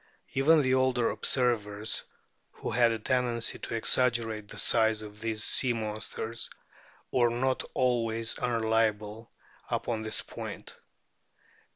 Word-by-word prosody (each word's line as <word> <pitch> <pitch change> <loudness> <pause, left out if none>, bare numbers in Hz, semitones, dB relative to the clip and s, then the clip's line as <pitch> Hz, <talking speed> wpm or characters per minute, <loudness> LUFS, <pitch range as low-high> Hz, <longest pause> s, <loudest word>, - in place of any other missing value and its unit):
Even 150 +3 +4
the 130 0 +2
older 130 -2 +2
observers, 110 -4 0 0.5
who - - -5
had 120 +1 +4
a 115 - -1
tendency 120 0 0
to - - -5
exaggerate 115 -2 +1
the 105 - -10
size 110 +1 +3
of 105 0 -11
these 110 -1 -1
sea 130 -2 +3
monsters, 110 +1 -4 0.6
were 120 -2 +3
not 130 +2 0
always 115 -3 +1
unreliable 110 -2 0 0.4
upon 115 -2 -2
this 110 0 -2
point. - - -8
115 Hz, 115 wpm, -29 LUFS, 110-125 Hz, 0.6 s, Even